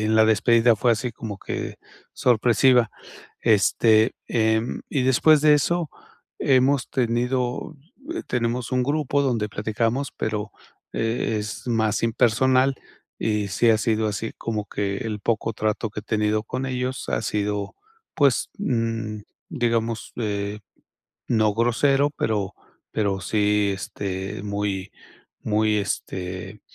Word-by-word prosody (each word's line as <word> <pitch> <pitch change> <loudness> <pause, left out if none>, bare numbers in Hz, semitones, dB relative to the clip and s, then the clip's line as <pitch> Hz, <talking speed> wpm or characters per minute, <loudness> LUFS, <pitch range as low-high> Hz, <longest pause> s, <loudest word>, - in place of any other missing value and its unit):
en 110 +1 +1
la 110 0 +6
despedida, 115 +1 +4
fue 120 +3 +2
así 120 +2 -2
como 110 -3 -7
que - - -5 0.4
sorpresiva. 120 0 +3 0.5
Este, 110 +1 +4
em, 110 0 +1
y 135 - +1
después 145 +4 +5
de 150 0 +6
eso, 170 +3 +1 0.5
hemos 135 0 +3
tenido, 125 +4 -1 0.4
eh, 350 - -3
tenemos 120 0 -1
un 125 0 +2
grupo 145 +1 +1
donde 115 -6 0
platicamos, 115 +6 -1
pero, 105 -1 -2 0.4
eh, 115 0 -1
es 105 +3 -6
más 110 -2 +1
impersonal 130 +3 +3 0.4
y 105 -2 0
sí 115 +4 +3
ha 110 - +4
sido 110 0 +1
así, 105 +2 -3
como 110 -2 -3
que 100 -1 -2
el 105 -1 -4
poco 115 +1 0
trato 110 +1 -1
que 105 - -6
he - - -17
tenido 105 -1 0
con 125 +4 -4
ellos, 130 0 -3
ha - - 0
sido, 105 -1 -2 0.4
pues, 140 -4 +3
mm, 115 - -2 0.3
digamos, 115 -5 -1
eh, 105 -2 -2 0.7
no 110 -2 +3
grosero, 135 +5 +2
pero 105 -8 -2 0.4
pero 100 -3 0
sí, 105 +1 +2
este, 95 0 -5
muy 100 -2 -3 0.5
muy, 105 0 +2
este, 95 0 -4
110 Hz, 130 wpm, -24 LUFS, 105-125 Hz, 0.7 s, la